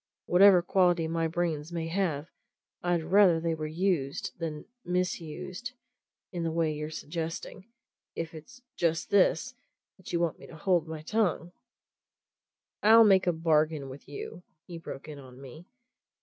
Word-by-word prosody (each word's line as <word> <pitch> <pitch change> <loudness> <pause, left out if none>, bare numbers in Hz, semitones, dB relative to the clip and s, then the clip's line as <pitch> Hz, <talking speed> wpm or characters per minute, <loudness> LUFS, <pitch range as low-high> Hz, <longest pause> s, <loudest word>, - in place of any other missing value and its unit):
Whatever 180 0 +6
quality 175 -2 +2
my 165 0 0
brains 160 -2 -2
may 165 -1 -3
have, 165 -5 -1 0.6
I'd 175 -2 0
rather 180 0 +5
they 165 0 -1
were 155 -1 -4
used 175 +1 -1
than 155 -3 -4 0.2
misused 180 +5 -3 0.6
in 175 - -4
the 165 - 0
way 160 -1 0
you're 150 +1 -5
suggesting! 165 +5 -6 0.5
If 165 -1 -4
it's 245 - -12
just 165 -1 0
this 200 +5 +3 0.4
that 190 - -11
you 170 - 0
want 170 -2 -1
me - - -12
to - - -12
hold 175 -1 +1
my 160 -1 -6
tongue 180 -3 0 0.7
" - - -64
"I'll 225 +2 +8
make 190 -3 +5
a - - +5
bargain 155 -3 +1
with 130 +2 -11
you," 145 +4 -7 0.2
he 170 -2 -8
broke 150 -3 -8
in 150 -2 -8
on 130 -2 -13
me. 140 +6 -12
165 Hz, 155 wpm, -29 LUFS, 155-180 Hz, 0.7 s, I'll